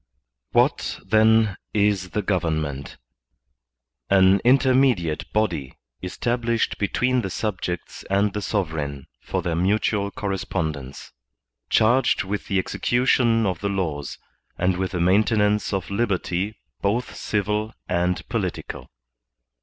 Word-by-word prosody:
* - - -60
What, - - +1
then, 110 -2 +4 0.2
is 100 -3 +2
the 105 +5 -2
government? 80 -7 -2 1.1
An 95 0 +5
intermediate 125 - +3
body 105 -11 -1 0.2
established 115 +5 -1
between 125 +5 +1
the 95 - -4
subjects 90 -4 -4
and 100 +1 +2
the 105 - -3
sovereign 80 -9 -2 0.2
for - - -3
their 85 - -1
mutual 100 +3 +1
correspondence, 80 -9 -4 0.6
charged 120 +2 +3
with 100 +1 -4
the 100 - 0
execution 120 +2 +2
of 95 -3 -1
the 100 - -2
laws 80 -8 -3 0.4
and 90 +1 +1
with 95 +1 -2
the 90 - -1
maintenance 105 +3 +2
of 95 -1 -3
liberty 100 -1 -1 0.3
both 115 +5 -1
civil 105 +1 -1 0.2
and 90 +1 0
political. - - -4
100 Hz, 115 wpm, -23 LUFS, 90-110 Hz, 1.1 s, An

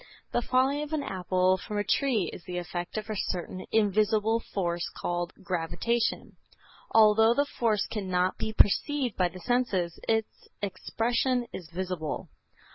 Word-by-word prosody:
The - - +1
falling 265 +4 +2
of 300 +1 -5
an 300 -2 0
apple 185 -2 +1
from 210 +3 -5
a 205 - +1
tree 225 - +1
is 170 - -9
the 180 -1 -4
effect 175 +2 -4
of 215 0 -3
a 215 - -3
certain 185 -1 -3
invisible 215 +1 +3
force 175 -6 -2
called 175 0 -3
gravitation. 185 +7 -1 0.5
Although 220 +1 +6
the 285 - +3
force 220 -7 0
cannot 185 -3 -1
be 220 - -2
perceived 250 +3 +3
by 180 - +2
the 185 +2 -10
senses, 190 -7 0
its 225 -1 -1
expression 240 +5 0
is 175 -4 -7
visible. 175 -3 -4
210 Hz, 145 wpm, -28 LUFS, 180-230 Hz, 0.5 s, Although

